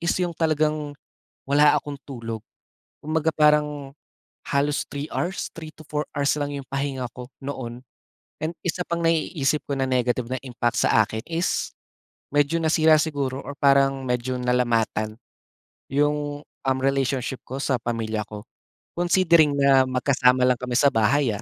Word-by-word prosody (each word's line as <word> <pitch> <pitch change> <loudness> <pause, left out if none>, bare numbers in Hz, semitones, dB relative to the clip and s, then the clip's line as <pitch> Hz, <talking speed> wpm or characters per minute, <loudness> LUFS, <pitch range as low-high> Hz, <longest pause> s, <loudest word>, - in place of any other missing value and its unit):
is 170 +1 +1
yung 175 -1 -1
talagang, 155 -2 0 0.5
wala 145 +1 +5
akong 145 -1 -4
tulog. 115 -4 -5 0.6
Kumbaga 155 +1 0
parang, 150 -2 +2 0.6
halos 145 +1 +1
3 145 +2 -5
hours? 180 +2 -2
3 160 -1 -8
to 155 - -13
4 150 0 -1
hours 140 0 +2
lang 145 0 -2
yung 135 - -7
pahinga 135 -2 -2
ko 125 -1 -7 0.2
noon. 125 -3 -6 0.6
And 160 +2 -3
isa 175 +1 -1
pang 170 0 -2
naiisip 155 -3 +1
ko 140 - -1
na 135 - 0
negative 125 -1 +1
na 130 - -2
impact 120 -2 -1
sa 110 - +4
akin 110 +1 -5
is 170 +2 -1 0.6
medyo 145 +3 +2
nasira 160 -1 +4
siguro 140 -4 -1
or 145 - -6
parang 135 -1 +3
medyo 125 +1 -1
nalamatan, 115 -3 0 0.7
yung, 145 +1 0 0.2
um, 130 -1 +1
relationship 135 -1 0
ko 135 +2 -6
sa 135 - +1
pamilya 110 -2 -2
ko. 105 -1 -9 0.5
Considering 170 -4 +4
na 140 -1 +5
magkasama 130 0 +2
lang 125 -2 +2
kami 125 -1 -3
sa 140 0 +5
bahay, 120 +3 +3
ah, 100 - -7
140 Hz, 150 wpm, -24 LUFS, 125-150 Hz, 0.7 s, wala